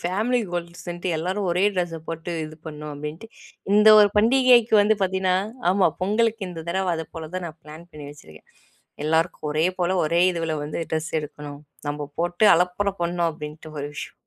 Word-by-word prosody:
Family 215 +8 0
கோல்ட்ஸ்ன்ட்டு 175 +1 -4
எல்லாரும் 185 +4 -2
ஒரே 180 +3 +2
ட்ரெஸ்ஸ 175 -3 -2
போட்டு 165 +1 -5
இது 155 0 -10
பண்ணும் 150 -1 -7
அப்பிடின்ட்டு 150 +8 -7 0.5
இந்த 210 +1 +6
ஒரு 205 - +6
பண்டிகைக்கு 240 0 +5
வந்து 215 +1 +3
பார்த்தீன்னா 190 -1 +1 0.4
ஆமா 190 -1 +3
பொங்கலுக்கு 215 0 0
இந்த 165 -2 -8
தடவ 185 0 0
அதப்போல 160 0 -7
தான் 180 -2 -4
நான் 160 0 -10
பிளான் 155 +3 -12
பண்ணி 150 -2 -9
வச்சுருக்கேன். 80 - -16 0.6
'எல்லாருக்கும் 160 0 0
ஒரே 155 +3 +2
போல 175 0 +1
ஒரே 170 +3 +2
இதுவுல 165 -2 -2
வந்து 150 - -5
ட்ரெஸ் 160 0 -1
எடுக்கணும். 145 -1 -9 0.3
நம்ம 145 0 -4
போட்டு 175 +4 +1
அலப்பற 180 +3 0
பண்ணும்' 170 0 0
அப்பிடின்ட்டு 155 0 -9
ஒரு 145 - -3
விஷயம். - - -7
170 Hz, 165 wpm, -23 LUFS, 155-190 Hz, 0.6 s, இந்த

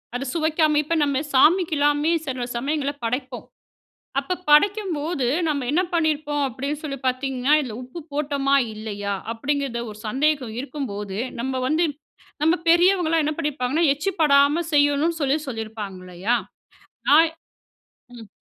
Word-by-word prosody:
அத 270 - -3
சுவைக்காம 315 -2 +2
இப்ப 330 +3 -1
நம்ம 280 -2 +1
சாமிக்குலாமே 300 0 +3
சில 255 -3 -3
சமயங்கள்ல 285 +2 -1
படைப்போம். 250 +1 -3 0.7
அப்ப 360 +6 -3
படைக்கும்போது 325 - +2 0.2
நம்ம 285 -4 -1
என்ன 345 - +3
பண்ணியிருப்போம் 300 -3 0
அப்டின்னு 280 +4 -4
சொல்லி 275 -3 -4
பார்த்தீங்கன்னா, 260 +1 0
இதில 235 -6 -6
உப்பு 255 +7 -9
போட்டோமா 280 -1 +1 0.2
இல்லையா 205 -2 -4 0.2
அப்டிங்கிறது 275 0 -2
ஒரு 210 - -12
சந்தேகம் 270 -1 0
இருக்கும்போது, 210 -9 -5 0.2
நம்ம 260 0 -2
வந்து 315 +5 +2 0.6
நம்ம 320 +2 +4
பெரியவங்கலாம் 345 -1 +4
என்ன 305 - 0
பண்ணியிருப்பாங்கன்னா 285 +2 -1
எச்சிப்படாம 300 -2 +3
செய்யணும்னு 290 +3 +2
சொல்லி 280 +1 +2
சொல்லியிருப்பாங்க. 220 -5 -5
இல்லையா? 185 +6 -1 0.7
நான் 320 +3 +7 0.9
ம். 225 -3 -11
285 Hz, 120 wpm, -23 LUFS, 255-310 Hz, 0.9 s, நான்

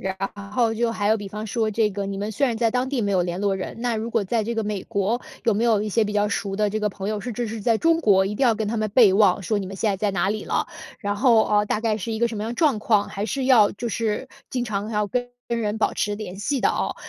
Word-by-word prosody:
然 190 0 -3 0.4
后 230 -1 +2
就 230 +1 0
还 205 -2 -1
有 220 - +4
比 205 -2 -7
方 210 +2 -6
说 220 +1 0
这 215 0 +1
个 200 0 -4
你 195 - -4
们 205 +2 -3
虽 275 +7 +1
然 235 -3 -1
在 230 -1 +2
当 250 +2 0
地 270 -2 -1
没 205 -2 0
有 185 -2 +2
联 175 +1 -3
络 200 -1 +1
人， 190 +4 -6
那 240 -2 0
如 220 +1 -3
果 220 - +1
在 220 +3 -1
这 235 +2 -2
个 225 - -1
美 205 -2 -3
国， 215 +2 -1 0.2
有 230 - +3
没 215 +3 0
有 220 -3 +3
一 215 - -2
些 215 +2 +2
比 210 - -3
较 210 0 +1
熟 200 -1 -2
的 210 0 +1
这 215 - -1
个 210 0 0
朋 195 0 -5
友， 215 -1 -2
甚 245 +4 -5
至 235 0 -2
是 220 0 -5
在 225 +2 +2
中 330 +6 +2
国， 195 - +4
一 200 - -3
定 275 - +2
要 235 -3 +4
跟 215 -1 -2
他 230 - -2
们 215 -1 0
备 220 -7 +7
忘， 195 -1 +4
说 210 +3 0
你 195 - -4
们 195 - -7
现 210 +2 0
在 195 - -1
在 205 +2 0
哪 190 0 +1
里 215 - -3
了。 - - -1 0.3
然 205 0 -2
后， 230 -1 +5
呃， 210 0 +3
大 210 - -1
概 225 -2 0
是 225 +2 -4
一 220 - -2
个 235 - +3
什 230 - -6
么 210 - -3
样 225 - -3
的 - - -6
状 285 -5 +2
况， 210 -1 +2
还 200 +2 -4
是 265 +5 -2
要 225 -6 +6
就 235 +4 -4
是 225 +2 -2 0.2
经 250 -2 -2
常 210 -1 -3
要 210 -1 0
跟 245 +4 -2 0.2
跟 235 - -1
人 210 +1 -1
保 - - +1
持 205 - -1
联 205 -3 -7
系 260 +6 -1
的 - - +3
哦。 - - -1
215 Hz, 340 characters per minute, -23 LUFS, 205-230 Hz, 0.4 s, 备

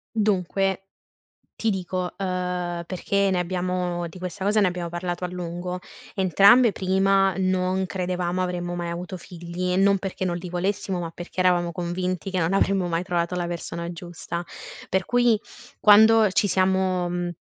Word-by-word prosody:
Dunque, 195 -2 0 0.7
ti 225 - -2
dico, 185 -2 -3
ehm, 180 -2 -2
perché 195 +2 0
ne 185 - +1
abbiamo 180 -1 -2
di 175 +3 -12
questa 180 +1 -6
cosa 210 +2 +3
ne 200 - +4
abbiamo 175 -1 -4
parlato 175 +1 -4
a - - -2
lungo: 180 0 -5 0.3
entrambe, 200 +5 +5
prima, 195 0 +2
non 185 0 +1
credevamo 180 -1 -2
avremmo 175 -1 -3
mai 175 -1 -3
avuto 175 +2 -5
figli, 180 +1 -4
non 195 +1 +4
perché 190 0 -4
non 175 -1 -1
li 175 +1 -6
volessimo, 185 +1 -2
ma 170 -2 -4
perchè 175 +2 -6
eravamo 175 -2 +2
convinti 180 +1 -3
che 185 - -1
non 170 +2 +1
avremmo 195 -2 +2
mai 165 0 0
trovato 175 -1 -1
la 175 -1 -1
persona 170 0 -5
giusta, 175 -1 -6 0.5
per 190 -1 0
cui 240 -1 +3 0.4
quando 220 0 +7
ci 205 - +2
siamo 185 -1 +1
mhmm, 175 0 -2
180 Hz, 160 wpm, -24 LUFS, 175-190 Hz, 0.7 s, quando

